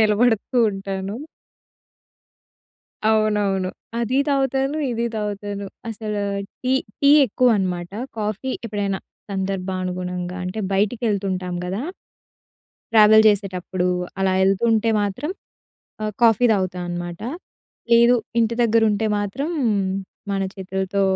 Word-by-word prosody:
నిలబడుతూ 220 +3 +2
ఉంటాను. 195 +1 -4 1.9
అవునవును. 205 -4 +1 0.3
అదీ 240 +3 +1
తాగుతాను. 270 +1 +1
ఇదీ 235 0 -1
తాగుతాను. 205 -1 -4 0.2
అసలు 215 -1 -3 0.4
టీ. 255 0 +1 0.3
టీ 280 - +5 0.2
ఎక్కువనమాట. 195 -7 +1 0.3
కాఫీ 215 +4 -2
ఎప్పుడైనా 200 -3 -2 0.3
సందర్భానుగుణంగా. 185 -2 -3
అంటే 185 +4 -4
బయటికెళ్తుంటాం 195 -3 0
గదా! 190 +6 -3 1.1
ట్రావెల్ 220 -1 +7
చేసేటప్పుడు 185 -3 0 0.3
అలా 190 -1 +2
యెళ్తుంటే 220 +4 +3
మాత్రం 205 - -2 0.7
ఆహ్, 215 -1 -2
కాఫీ 235 +1 +5
తాగుతా 185 -3 0
అనమాట. 175 0 -5 0.7
లేదు 235 +1 +7 0.2
ఇంటి 230 0 +2
దగ్గర 230 -1 +4
ఉంటే 210 +2 0
మాత్రం 205 +10 -3 0.8
మన 195 0 0
చేతులతో 190 0 -2
205 Hz, 95 wpm, -22 LUFS, 190-225 Hz, 1.9 s, ట్రావెల్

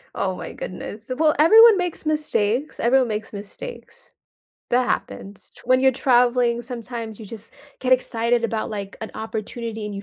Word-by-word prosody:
Oh 185 -1 -1
my - - -7
goodness. 210 +6 -7
Well, 310 -1 +4
everyone 440 +6 +8
makes 355 -3 -3
mistakes. 300 -4 -1
Everyone 255 +1 +3
makes 215 0 -4
mistakes. 205 - -9 0.6
That 250 +1 +2
happens. 200 0 -4
T - - -15
when 255 0 +3
you're 265 0 +5
traveling, 245 -2 +2
sometimes 235 -2 -7
you 220 - -9
just 225 +1 -9 0.3
get 255 0 +1
excited 235 -1 +1
about, 225 -1 -2
like, 200 -2 -6
an 220 - -6
opportunity 220 0 -5
and 205 - -6
you 200 - -6
235 Hz, 160 wpm, -22 LUFS, 215-255 Hz, 0.6 s, everyone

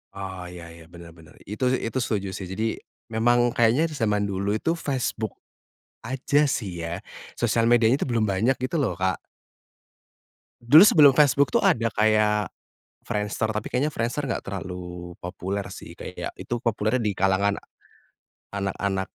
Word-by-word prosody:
Oh, 95 -2 -6
iya 85 -1 -10
iya, 85 0 -13
benar 85 -1 -12
benar. 80 -1 -17
Itu, 105 +6 -2
sih - - 0
itu 125 +3 -2
setuju 100 -5 -2
sih. 95 -1 -6
Jadi, 110 +4 -2 0.3
memang 120 +2 +3
kayaknya 125 +8 +3
di - - -6
zaman 105 -4 +1
dulu 100 +2 -1
itu 165 +9 0
Facebook 130 - -3 0.7
aja 140 +3 +1
sih 95 -10 -3
ya? 85 +3 -5 0.3
Sosial 115 -1 +1
medianya 120 +2 +4
itu - - 0
belum 115 -2 +1
banyak 110 +8 +2
gitu 130 +6 -1
loh, 130 -11 0
Kak. 95 0 0 1.4
Dulu 145 +8 +8
sebelum 150 -9 +7
Facebook 140 -2 +3
itu - - +3
ada 115 -1 +3
kayak 105 -1 +2 0.5
Friendster, 105 +1 -2
tapi 105 - -4
kayaknya 140 +5 +1
Friendster 135 +2 -2
enggak 115 - -3
terlalu 90 -2 -7
populer 95 +2 -4
sih - - -10
kayak - - -7
itu 120 -1 -4
populernya 110 +1 0
di 105 -4 -1
kalangan 95 +1 +2 0.9
anak-anak 100 -1 -2
110 Hz, 155 wpm, -25 LUFS, 95-120 Hz, 1.4 s, Dulu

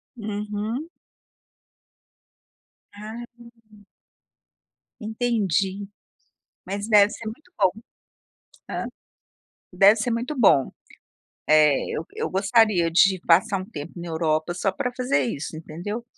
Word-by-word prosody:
Uhum. 210 +6 -4 2.1
Ah, 220 +3 -8 0.4
hum. 210 -2 -20 1.1
Entendi, 205 -4 -1 0.8
mas 200 +3 -4
deve 210 -1 +6
ser 225 - -9
muito 305 +11 -9
bom. 190 -3 +3 1.0
Hã, - - -3 0.9
deve 195 +4 +6
ser 230 +2 -1
muito 245 +6 -2
bom, 150 - +4 0.8
eh, 150 -2 +5
eu 160 - -3
eu - - -2
gostaria 195 -3 +3
de 185 +2 +4
passar 185 +3 +4
um - - -6
tempo 150 -4 -7
na 170 0 -7
Europa 160 +1 0
só 190 +1 -1
para 250 +3 -2
fazer 245 - +1
isso, 145 +5 -5
entendeu? 180 +9 -6
200 Hz, 110 wpm, -24 LUFS, 170-220 Hz, 2.1 s, deve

